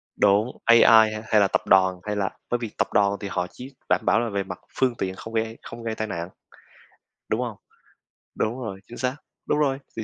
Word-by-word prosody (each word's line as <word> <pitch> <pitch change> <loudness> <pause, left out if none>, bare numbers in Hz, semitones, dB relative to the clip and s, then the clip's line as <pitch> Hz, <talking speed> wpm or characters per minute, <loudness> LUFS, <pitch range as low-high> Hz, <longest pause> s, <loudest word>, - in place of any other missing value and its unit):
Đúng, 105 +5 +2
AI 115 0 +7
hay 110 -1 +6
hay 105 -2 +4
là 100 - +4
tập - - 0
đoàn 95 -1 +4
hay 105 0 -3
là 100 -2 0 0.2
bởi 120 - +1
vì 115 -3 -5
tập - - +1
đoàn 100 -1 +3
thì 100 - -5
họ 90 0 -1
chỉ 130 +2 -10 0.2
đảm - - +3
bảo 105 +5 +4
là 120 -1 -1
về 100 -1 -1
mặt 90 -1 -8 0.2
phương 125 -3 +1
tiện 95 -3 -3
không 115 +3 -9
gây 110 0 -1
không 115 0 -9
gây 110 -1 -3
tai 110 - -3
nạn, 85 -2 -4 1.0
đúng - - 0
hông? - - -4 0.8
Đúng 120 +4 -1
rồi, 100 -6 -6
chính 120 - -10
xác, 130 +2 -1 0.3
đúng 150 - +1
rồi, 135 -2 +1 0.2
thì, 110 - -2
110 Hz, 225 wpm, -24 LUFS, 100-120 Hz, 1.0 s, AI